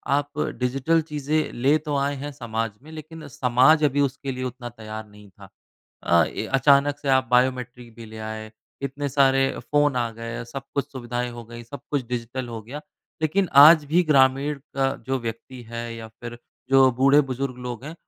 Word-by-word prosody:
आप 145 +1 -3 0.2
डिजिटल 135 +6 +1
चीज़ें 150 0 -2
ले 135 +5 +3
तो 150 -1 -1
आए 140 +1 0
हैं 145 - -5
समाज 115 -5 -3
में 155 - -13
लेकिन 160 0 -10
समाज 130 +4 +3
अभी 145 -1 +2
उसके 135 0 -2
लिए 130 0 -5
उतना 125 -1 -6
तैयार 110 -2 -8
नहीं 105 0 -16
था। 95 - -16 0.5
अ, 85 -1 +4
ये 110 - -5
अचानक 140 +1 +4
से 140 - -6
आप 130 -1 +4
बायोमेट्रिक 125 -1 0
भी 115 - -10
ले 110 0 -10
आए, 110 0 -7 0.3
इतने 140 +1 -3
सारे 135 -1 +3
फ़ोन 145 -2 +1
आ 120 -2 0
गए 115 +1 -6
सब 135 +3 -7
कुछ 140 0 -2
सुविधाएँ 120 -1 -4
हो 120 0 -9
गयीं 120 +1 -10
सब 135 +3 -9
कुछ 140 -5 -1
डिजिटल 125 +1 -4
हो 115 -1 -6
गया 130 +7 -8 0.4
लेकिन 185 +4 +1 0.2
आज 155 0 +8
भी 175 +2 +5
ग्रामीण 140 -1 +3 0.2
का 135 0 +1
जो 135 0 0
व्यक्ति 115 +2 -7
है 115 0 -4
या 115 -1 -8
फिर 120 +2 -10 0.3
जो 135 -1 +6
बूढ़े-बुज़ुर्ग 135 0 +2
लोग 120 0 -6
हैं 155 +3 -7
130 Hz, 185 wpm, -24 LUFS, 120-145 Hz, 0.5 s, आज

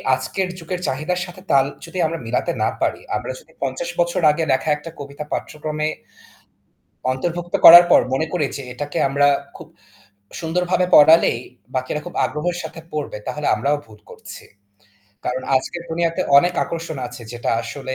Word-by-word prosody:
আজকের 190 +7 -3
যুগের 180 +2 -5
চাহিদার 155 +7 -2
সাথে 185 0 -12
তাল 135 -1 +5 0.2
যদি 170 +2 -9
আমরা 165 +1 -2
মিলাতে 115 +2 -1
না - - +2
পারি, - - 0
আমরা 105 - -3
যদি - - -22
৫০ 135 +5 -3
বছর 175 +1 +1
আগে 160 +2 -2
লেখা 130 +4 +1
একটা 150 +3 -6
কবিতা 140 +1 -7
পাঠ্যক্রমে 155 0 -3 1.3
অন্তর্ভুক্ত 175 +5 -4
করার 175 +1 +12
পর - - +7
মনে 155 +4 0
করি 165 -5 +1
যে 140 - -6
এটাকে 145 +3 -4
আমরা 145 +1 +3 0.3
খুব - - -11 0.7
সুন্দরভাবে 180 +2 0
পড়ালেই 160 -4 +7 0.4
বাকিরা 130 +4 -2
খুব 175 - -8
আগ্রহের 175 +4 -2
সাথে 165 - -8
পড়বে 150 -8 -4
তাহলে 150 0 -3
আমরাও 140 +7 0
ভুল 110 -1 -16
করছি। - - -11 0.8
কারণ 130 +1 -2
আজকের 170 +6 -3
দুনিয়াতে 165 0 -1 0.2
অনেক 175 +4 +2
আকর্ষণ 165 -2 -5
আছে 120 0 -10
যেটা 120 0 -3
আসলে 130 +3 -6
150 Hz, 155 wpm, -21 LUFS, 135-170 Hz, 1.3 s, করার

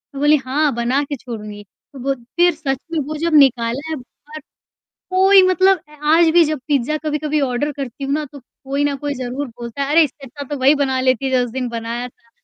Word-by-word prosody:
मैं - - -5
बोली, 295 +1 +5
"हाँ, 285 +1 +1
बना 250 +4 0
के 285 0 -5
छोड़ूँगी।" 210 -4 -8 0.3
तो 270 - -10
वो 275 +2 0 0.2
फिर 350 -1 +4
सच 275 -4 -2
में 325 - -1
वो 310 - -4
जब 335 - 0
निकाला 265 +1 +3
है 315 - -2
बाहर। 295 +4 -12 0.7
कोई 380 +1 +6
मतलब, 375 +1 +4
अ, 300 -1 -17
आज 325 +2 +5
भी 340 0 +5
जब 305 -1 -2
पिज़्ज़ा 285 +1 +1
कभी-कभी 300 0 -1
ऑर्डर 270 +2 -1
करती 275 -1 -6
हूँ 275 - -2
ना, 305 0 -1
तो 280 - -11 0.2
कोई 280 +2 -1
न 285 -1 0
कोई 285 +1 -4
ज़रूर 255 +2 -4
बोलता 235 +3 -7
है, 275 - -2
"अरे! 325 +2 +6
इससे 275 -1 -8
अच्छा 285 +3 -8
तो - - -4
वही 275 +3 +5
बना 260 -1 -1
लेती 260 +1 +1
जो 255 -1 +2
उस 240 - -7
दिन 255 0 -3
बनाया 235 +1 -4
था।" 235 -1 -29
280 Hz, 225 wpm, -19 LUFS, 250-305 Hz, 0.7 s, कोई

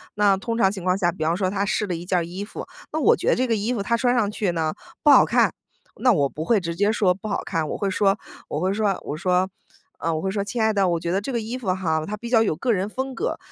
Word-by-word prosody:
那 205 -1 +4
通 230 +4 -3
常 195 -4 +4
情 190 -3 -7
况 185 +1 +2
下， 175 -3 +1
比 165 -2 -5
方 165 +2 +1
说 190 -1 0
她 195 +1 -1
试 210 +1 0
了 185 - -3
一 165 - -6
件 180 0 0
儿 170 - 0
衣 180 +4 -6
服， 205 - -7 0.3
那 315 - -1
我 295 - +5
觉 - - -5
得 - - +4
这 255 - +1
个 230 -3 +1
衣 215 +3 -1
服 200 - -2
她 235 - +1
穿 245 +1 +2
上 210 -4 +1
去 210 -4 -1
呢， 160 -2 -1 0.3
不 295 - +7
好 - - +8
看， - - +2 0.5
那 250 - +5
我 145 -10 +3
不 155 +3 -6
会 220 +5 +3
直 170 -2 -4
接 205 +4 +2
说 195 -4 +2
不 195 +4 -8
好 - - -2
看。 160 -4 -2
我 - - -3
会 200 -2 -1
说 195 +1 +2 0.3
我 150 - -2
会 185 +3 0
说， 205 -2 0
我 - - -3
说， 180 +3 +1 0.5
呃， 165 - -1
我 155 - -1
会 190 - -1
说： 200 0 -1
“亲 235 +4 -4
爱 220 0 +3
的， 195 -2 +2
我 170 -1 0
觉 170 - -4
得 195 +2 +1
这 240 - -4
个 235 - 0
衣 225 +3 -4
服 220 -8 -1
哈， 160 -4 -1
它 210 +4 -4
比 235 - -7
较 230 -2 +5
有 195 - 0
个 240 +10 0
人 195 0 -1
风 260 +4 -4
格， 465 - -2
195 Hz, 330 characters per minute, -23 LUFS, 175-220 Hz, 0.5 s, 好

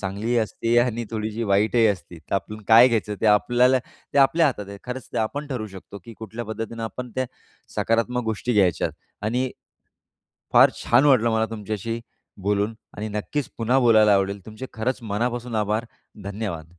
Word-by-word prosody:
चांगलीही 105 +5 -2
असते 115 +1 0
आणि 120 -1 +1
थोडीशी 110 0 -3
वाईटही 110 +3 +4
असती, 90 -4 -2
तर 80 - -5
आपण 105 +2 -3
काय 115 +3 +8
घ्यायचं 110 -3 -1
ते - - +1
आपल्याला 120 +5 +4
ते 130 - -6
आपल्या 160 +4 +5
हातात 105 -8 -3
आहे. 100 0 -8
खरंच 125 0 -6
ते - - -1
आपण 140 +7 -2
ठरवू 125 -6 -4
शकतो 100 +2 -10
की 115 - -10
कुठल्या 110 +2 -6
पद्धतीनं 115 +1 -5
आपण 120 +3 -6
त्या 130 0 -1 0.5
सकारात्मक 115 +2 +1
गोष्टी 110 +2 -1
घ्यायच्यात. 95 -6 +2 0.3
आणि 125 +4 0 1.0
फार - - +7
छान 120 +4 +4
वाटलं 125 -5 +4
मला 110 0 +1
तुमच्याशी 110 +1 -4 0.4
बोलून 105 +2 0 0.2
आणि 105 +3 -4
नक्कीच 105 +7 -3
पुन्हा 120 +3 +2
बोलायला 110 -4 +5
आवडेल 100 0 -1
तुमचे 110 +4 -7
खरंच 125 +3 -2
मनापासून 120 +3 -2
आभार. 105 +1 0 0.4
धन्यवाद. 90 -5 -5
110 Hz, 165 wpm, -24 LUFS, 105-120 Hz, 1.0 s, काय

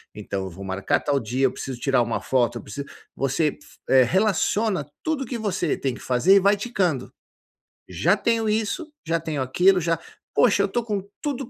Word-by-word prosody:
Então 100 -2 -4
eu 95 - -5
vou 95 +3 -9
marcar 95 +1 0
tal 140 -1 +1
dia, 125 +3 0
eu - - -3
preciso 130 -2 -6
tirar 135 -2 +2
uma 115 -1 -2
foto, 120 -2 +1
eu - - -12
preciso, 140 +7 -7
eh, - - -14 0.2
você 140 +3 0 0.5
relaciona 195 - +1 0.2
tudo 310 -4 -1
o - - -9
que 240 - -3
você 190 -7 -1
tem 135 -2 -2
que - - -11
fazer 130 +11 +4
e - - +7
vai 200 +2 +4
ticando. 195 - -1 0.8
Já 140 - +2
tenho 225 +1 +1
isso, 220 +9 -1
já 165 +1 +1
tenho 155 -3 -3
aquilo, 180 +9 +3
já 165 0 +1 0.4
"Poxa 205 -4 +4
eu 200 - +2
estou 240 +4 -1
com 210 -3 -2 0.2
tudo 275 -4 -3
170 Hz, 200 wpm, -24 LUFS, 130-210 Hz, 0.8 s, e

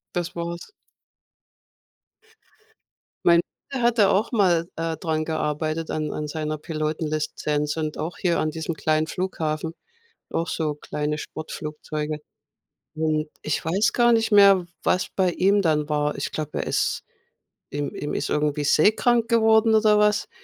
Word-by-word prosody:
Das 175 -1 -2
war's. 170 0 -5 2.5
Mein 170 0 +6 0.3
Bruder 270 -3 -3
hatte 235 -4 +4
auch 205 +6 +1
mal, 180 -7 +3
äh, 165 0 -2
dran 155 -1 -1
gearbeitet, 155 0 -2
an 155 -1 -2
an 150 - -3
seiner 155 0 -3
Pilotenlizenz 155 -1 -2
und 155 -2 -3
auch 160 +3 -4
hier 175 -2 +1
an 155 - 0
diesem 160 +1 -4
kleinen 155 +1 +1
Flughafen, 165 -3 -3 0.6
auch 165 - -1
so 155 -2 -1
kleine 150 0 -3
Sportflugzeuge. 150 -1 -5 0.8
Hm, 155 -1 0
ich 155 - -1
weiß 190 +7 +2
gar 240 -1 +4
nicht 225 -1 +2
mehr, 200 -3 +6 0.2
was 185 - +1
bei 185 -2 +2
ihm 195 +4 +3
dann 155 -5 +1
war. 150 -1 0
Ich - - -4
glaube, 155 -1 -3
er - - -5
ist - - 0 0.7
ihm 145 0 -3
ihm 145 - -4
ist - - -2
irgendwie 150 0 0
seekrank 220 - +3
geworden 220 -1 +4
oder 215 -1 +5
was. 210 0 +2
160 Hz, 140 wpm, -24 LUFS, 150-195 Hz, 2.5 s, Mein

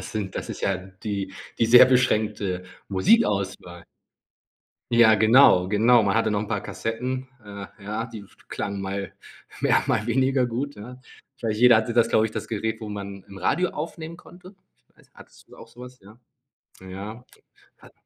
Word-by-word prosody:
das - - -9
sind 100 -3 -4
das - - -5
ist - - -7
ja 95 - +1
die 95 +2 -6 0.3
die 115 - +3
sehr 120 +2 +8
beschränkte 105 -7 0 0.2
Musikauswahl. 95 - 0 1.1
Ja, 115 -2 +6
genau, 110 -3 +5
genau. 115 +4 +4
Man 100 - +1
hatte 115 -1 +1
noch 105 - 0
'n 105 - -4
paar 105 -2 -2
Kassetten, 120 +6 -4 0.2
äh, 100 -1 -8 0.2
ja, 105 +3 -4
die 115 -2 -9
f 100 - -18
klangen 100 -1 -4
mal 100 0 -5 0.5
mehr, - - +3
mal 110 0 0
weniger 130 +1 +1
gut, 130 +5 -4
ja. 120 +5 -10 0.4
Ich 130 - -26
weiß 115 - -1
nicht, 105 - -5
jeder 125 -2 +7
hatte 110 +1 -1
das, 120 -1 +3
glaube 110 - +3
ich, 110 - -2
das - - -5
Gerät, 110 0 -3
wo 110 - -7
man 100 -1 -7
'n 100 - -12
Radio 175 - 0
aufnehmen 160 +1 -7
konnte. 180 +2 -15 0.2
Ich 60 - -40
weiß, - - -25
hattest - - -18
du - - -16
auch - - -13
so 115 +2 -17
was, 125 0 -11
ja. 105 +4 -17 0.6
Ja. 100 +6 -9 0.5
Hat - - -18
110 Hz, 185 wpm, -24 LUFS, 100-125 Hz, 1.1 s, sehr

